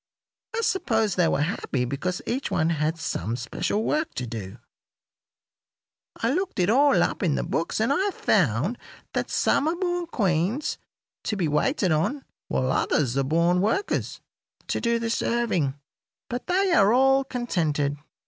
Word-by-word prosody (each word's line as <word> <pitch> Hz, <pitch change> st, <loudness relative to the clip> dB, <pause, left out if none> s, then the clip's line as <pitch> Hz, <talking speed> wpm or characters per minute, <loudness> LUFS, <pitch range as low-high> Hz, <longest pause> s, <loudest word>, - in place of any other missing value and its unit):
I 460 Hz, -, 0 dB
suppose 235 Hz, -, +1 dB
they 175 Hz, -2 st, +3 dB
were 145 Hz, -, +1 dB
happy 145 Hz, -6 st, -2 dB
because 160 Hz, +8 st, -3 dB
each 260 Hz, +3 st, -2 dB
one 160 Hz, 0 st, +1 dB
had 155 Hz, +1 st, 0 dB
some 115 Hz, -, -3 dB
special 205 Hz, -, -2 dB
work 305 Hz, +6 st, -1 dB
to 125 Hz, -, -3 dB
do. 110 Hz, -5 st, -7 dB, 1.6 s
I 230 Hz, +3 st, 0 dB
looked 380 Hz, +4 st, -2 dB
it 185 Hz, +2 st, +3 dB
all 280 Hz, +3 st, +5 dB
up -, -, -2 dB
in 165 Hz, -7 st, +2 dB
the -, -, -1 dB
books, 165 Hz, +5 st, -2 dB
and 225 Hz, +6 st, +2 dB
I 385 Hz, +7 st, +1 dB
found 180 Hz, -, +1 dB, 0.3 s
that -, -, -1 dB
some 290 Hz, -, +2 dB
are 325 Hz, -, +1 dB
born 350 Hz, -1 st, -2 dB
queens, 200 Hz, -, 0 dB, 0.5 s
to 215 Hz, -, -1 dB
be 175 Hz, -4 st, +1 dB
waited 185 Hz, -, +1 dB
on, 210 Hz, -, 0 dB, 0.2 s
while 130 Hz, 0 st, 0 dB
others 130 Hz, -3 st, +1 dB
are 135 Hz, -, +2 dB
born 170 Hz, +5 st, +2 dB
workers, 380 Hz, -, -1 dB, 0.5 s
to -, -, -1 dB
do 235 Hz, 0 st, +2 dB
the 230 Hz, 0 st, -2 dB
serving. 220 Hz, -, 0 dB, 0.6 s
But 245 Hz, +1 st, -4 dB
they 375 Hz, +1 st, +2 dB
are 205 Hz, -10 st, +5 dB
all 270 Hz, +2 st, +4 dB
contented. 160 Hz, -, -1 dB
205 Hz, 160 wpm, -25 LUFS, -, 1.6 s, all